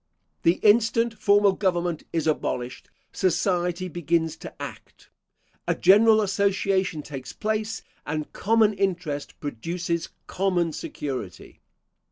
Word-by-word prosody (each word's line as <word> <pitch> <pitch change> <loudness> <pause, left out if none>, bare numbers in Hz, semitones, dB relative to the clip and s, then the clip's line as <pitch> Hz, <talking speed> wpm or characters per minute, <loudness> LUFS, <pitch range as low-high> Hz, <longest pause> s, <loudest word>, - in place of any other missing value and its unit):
The 170 - +4
instant 230 +2 +4
formal 205 -1 +5
government 175 -4 -1
is 165 -2 -1
abolished, 125 -5 -2 0.2
society 180 0 0
begins 165 -1 0
to - - -11
act: - - -10 0.6
a - - +2
general 215 +3 +6
association 195 -4 0
takes 135 -3 -8
place, 215 0 -2 0.2
and 150 0 -4
common 220 0 +3
interest 180 -7 -2
produces 170 +5 -3 0.2
common 175 -4 0
security. 130 -14 -6
180 Hz, 105 wpm, -25 LUFS, 160-200 Hz, 0.6 s, general